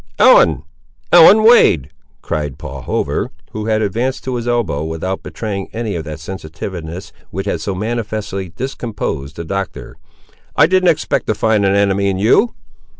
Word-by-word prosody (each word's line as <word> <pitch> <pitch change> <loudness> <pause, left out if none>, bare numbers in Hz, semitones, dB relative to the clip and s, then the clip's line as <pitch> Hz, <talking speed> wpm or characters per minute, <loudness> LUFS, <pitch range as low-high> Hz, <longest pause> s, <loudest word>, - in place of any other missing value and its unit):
"Ellen! - - +5 0.5
Ellen 175 +6 +8
Wade," 85 - +5 0.3
cried 75 -3 -3
Paul - - -8
Hover, - - -2 0.2
who 110 0 -5
had 110 0 +1
advanced 120 +6 -2
to 130 - -3
his 120 -1 -3
elbow, 120 -12 0
without 80 +4 -3
betraying 100 -3 -5
any 110 -3 -3
of 80 - -3
that 75 0 -7
sensitiveness 85 0 -7 0.2
which 95 +3 -5
had 100 - -2
so 100 - -3
manifestly 105 -3 -3
discomposed 85 - -5
the 85 - -5
Doctor; 95 +1 -5 0.6
"I - - +6
didn't 185 +1 +3
expect 160 - 0
to 110 - +1
find 105 -2 +2
an 95 - +2
enemy 100 0 +2
in 95 - -1
you!" 115 - +3
100 Hz, 155 wpm, -17 LUFS, 85-115 Hz, 0.6 s, Ellen